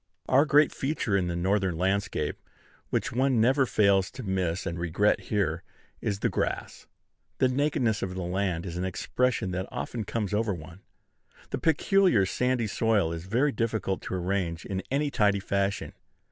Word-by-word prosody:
Our 135 Hz, +3 st, +5 dB
great 150 Hz, 0 st, +5 dB
feature 135 Hz, -7 st, -1 dB
in 95 Hz, -3 st, +1 dB
the 85 Hz, -, -2 dB
Northern 95 Hz, 0 st, 0 dB
landscape, 95 Hz, -4 st, -1 dB, 0.5 s
which -, -, -1 dB
one 130 Hz, 0 st, +2 dB
never 130 Hz, +4 st, +3 dB
fails 100 Hz, -3 st, +3 dB
to 130 Hz, 0 st, -7 dB
miss 95 Hz, -3 st, -1 dB
and 85 Hz, 0 st, -3 dB
regret 85 Hz, +5 st, +2 dB
here, 95 Hz, -6 st, 0 dB, 0.4 s
is 100 Hz, -2 st, -2 dB
the -, -, +2 dB
grass. -, -, -3 dB, 0.5 s
The 130 Hz, -, +4 dB
nakedness 130 Hz, -5 st, +1 dB
of 90 Hz, -1 st, -3 dB
the 95 Hz, -, -3 dB
land 90 Hz, -1 st, -1 dB
is 85 Hz, -1 st, -5 dB
an 90 Hz, -, -2 dB
expression 95 Hz, +3 st, -1 dB
that 90 Hz, +1 st, -3 dB
often 115 Hz, -2 st, -4 dB
comes 105 Hz, 0 st, -3 dB
over 105 Hz, -2 st, +1 dB
one. 85 Hz, +3 st, -11 dB, 0.7 s
The -, -, -2 dB
peculiar 165 Hz, -, +3 dB
sandy 125 Hz, +4 st, 0 dB
soil 105 Hz, -5 st, +1 dB
is 85 Hz, +1 st, -6 dB
very 130 Hz, +8 st, +2 dB
difficult 110 Hz, -4 st, -1 dB
to -, -, -4 dB
arrange 90 Hz, -2 st, -2 dB
in 95 Hz, -1 st, -3 dB
any 145 Hz, +2 st, 0 dB
tidy 100 Hz, -4 st, +2 dB
fashion. 100 Hz, +1 st, -1 dB
100 Hz, 165 wpm, -28 LUFS, 90-120 Hz, 0.7 s, Our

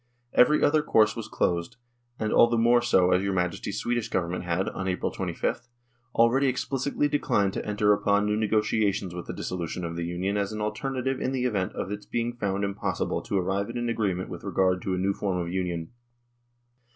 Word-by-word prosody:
Every 150 Hz, +5 st, +5 dB
other 155 Hz, +1 st, +4 dB
course 110 Hz, -7 st, +3 dB
was 115 Hz, -, -5 dB
closed, 85 Hz, +2 st, -1 dB, 0.4 s
and 110 Hz, -1 st, -1 dB
all 120 Hz, -, +7 dB
the 120 Hz, 0 st, 0 dB
more 120 Hz, +1 st, +4 dB
so 95 Hz, -7 st, +3 dB
as 90 Hz, +1 st, +4 dB
your 100 Hz, 0 st, -1 dB
Majesty's 90 Hz, +3 st, -2 dB
Swedish 120 Hz, 0 st, -1 dB
Government 90 Hz, 0 st, -1 dB
had, 90 Hz, +3 st, 0 dB
on 95 Hz, -, -5 dB
April 90 Hz, -1 st, -1 dB
25th, -, -, -3 dB, 0.5 s
already 125 Hz, +4 st, +4 dB
explicitly 135 Hz, +2 st, 0 dB
declined 100 Hz, -9 st, +1 dB
to -, -, -3 dB
enter 105 Hz, 0 st, +2 dB
upon 100 Hz, 0 st, +2 dB
new 105 Hz, 0 st, +1 dB
negotiations 105 Hz, -3 st, +1 dB
with 90 Hz, 0 st, -7 dB
the -, -, -4 dB
dissolution 90 Hz, 0 st, -4 dB
of 85 Hz, 0 st, -4 dB
the 85 Hz, -, -3 dB
Union 95 Hz, +4 st, -1 dB
as 100 Hz, 0 st, -1 dB
an 110 Hz, -, -5 dB
alternative 130 Hz, +5 st, -2 dB
in 130 Hz, -, -1 dB
the 130 Hz, -1 st, 0 dB
event 100 Hz, -7 st, -1 dB
of 95 Hz, -, -4 dB
its 105 Hz, 0 st, -6 dB
being 120 Hz, 0 st, -1 dB
found 100 Hz, -4 st, -2 dB
impossible 100 Hz, 0 st, -2 dB
to 100 Hz, -, -2 dB
arrive 95 Hz, +2 st, -1 dB
at -, -, -6 dB
an 120 Hz, 0 st, -1 dB
agreement 100 Hz, -6 st, -1 dB
with -, -, -8 dB
regard 95 Hz, -1 st, +1 dB
to 95 Hz, -, -1 dB
a -, -, -3 dB
new 95 Hz, +2 st, +1 dB
form 95 Hz, -2 st, -2 dB
of 85 Hz, 0 st, -3 dB
Union. 90 Hz, -3 st, -2 dB
100 Hz, 200 wpm, -27 LUFS, 90-115 Hz, 0.5 s, all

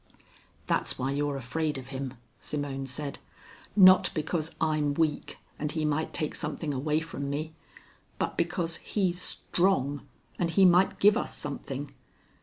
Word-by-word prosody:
"That's -, -, 0 dB
why 130 Hz, +1 st, -1 dB
you're 145 Hz, 0 st, -1 dB
afraid 150 Hz, +4 st, -2 dB
of 130 Hz, 0 st, -8 dB
him," 135 Hz, -1 st, -5 dB, 0.2 s
Simone 140 Hz, -2 st, -3 dB
said. 140 Hz, +2 st, -4 dB, 0.6 s
"Not 185 Hz, -2 st, +8 dB
because 155 Hz, 0 st, -1 dB
I'm 155 Hz, -3 st, +1 dB
weak, 155 Hz, -2 st, 0 dB, 0.2 s
and 150 Hz, 0 st, -2 dB
he 155 Hz, -1 st, -1 dB
might 150 Hz, +1 st, 0 dB
take 155 Hz, -3 st, -2 dB
something 150 Hz, -1 st, -3 dB
away 150 Hz, +4 st, 0 dB
from 140 Hz, -4 st, -5 dB
me, 155 Hz, +3 st, -3 dB, 0.7 s
but -, -, -1 dB
because 170 Hz, -2 st, -1 dB
he's 180 Hz, -3 st, -1 dB
strong, 145 Hz, -9 st, +1 dB, 0.4 s
and 175 Hz, -, +1 dB
he 190 Hz, +3 st, +5 dB
might 180 Hz, +1 st, +5 dB
give 205 Hz, +1 st, +6 dB
us 245 Hz, -, -2 dB
something. 140 Hz, -1 st, -5 dB
150 Hz, 145 wpm, -29 LUFS, 140-165 Hz, 0.7 s, Not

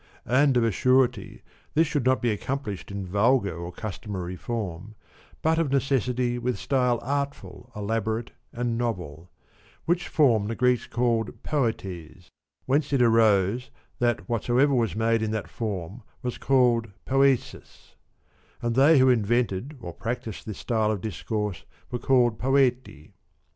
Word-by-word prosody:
And 130 Hz, +2 st, +3 dB
of 120 Hz, -, +3 dB
a 115 Hz, -, +2 dB
surety 130 Hz, +4 st, +1 dB, 0.3 s
this 160 Hz, +2 st, +5 dB
should 145 Hz, -4 st, -2 dB
not 130 Hz, -1 st, +2 dB
be 120 Hz, -, +2 dB
accomplished 105 Hz, -2 st, -4 dB
in 100 Hz, -1 st, -5 dB
vulgar 100 Hz, -2 st, +1 dB
and 85 Hz, +1 st, -7 dB
customary 95 Hz, -4 st, -5 dB
form 105 Hz, -1 st, -5 dB, 0.5 s
but 160 Hz, +1 st, +2 dB
of 155 Hz, -5 st, 0 dB
necessity 125 Hz, -2 st, 0 dB
with 125 Hz, 0 st, -1 dB
style 125 Hz, -3 st, +1 dB
artful, 140 Hz, -2 st, -4 dB
elaborate, 110 Hz, +2 st, -2 dB, 0.2 s
and 120 Hz, -1 st, -2 dB
novel; 90 Hz, -8 st, -4 dB, 0.6 s
which 175 Hz, +1 st, 0 dB
form 115 Hz, -9 st, +3 dB
the 115 Hz, -, -3 dB
Greeks 125 Hz, -1 st, +1 dB
called 120 Hz, -3 st, -1 dB
poetes; 95 Hz, -, -3 dB, 0.3 s
whence 140 Hz, +2 st, +1 dB
it 135 Hz, -3 st, +2 dB
arose 110 Hz, 0 st, +3 dB
62 -, -, -26 dB, 0.3 s
that 120 Hz, -8 st, 0 dB
whatsoever 120 Hz, +4 st, +2 dB
was 115 Hz, -5 st, +1 dB
made 115 Hz, +1 st, +1 dB
in 110 Hz, -, -1 dB
that 110 Hz, -1 st, -3 dB
form 100 Hz, -1 st, -5 dB, 0.2 s
was 125 Hz, -1 st, -4 dB
called 125 Hz, -4 st, +3 dB, 0.2 s
poesis; 135 Hz, -1 st, 0 dB, 0.7 s
and 120 Hz, -1 st, -1 dB
they 140 Hz, +5 st, +6 dB
who 130 Hz, 0 st, +5 dB
invented 120 Hz, +3 st, 0 dB
or 85 Hz, -4 st, -7 dB
practised 115 Hz, -1 st, -5 dB
this 105 Hz, -, -5 dB
style 110 Hz, -2 st, 0 dB
of 105 Hz, -4 st, -1 dB
discourse 105 Hz, -2 st, -3 dB, 0.3 s
were 120 Hz, -, -2 dB
called 120 Hz, -4 st, +2 dB
poeti. 125 Hz, -, 0 dB
120 Hz, 145 wpm, -26 LUFS, 105-130 Hz, 0.7 s, they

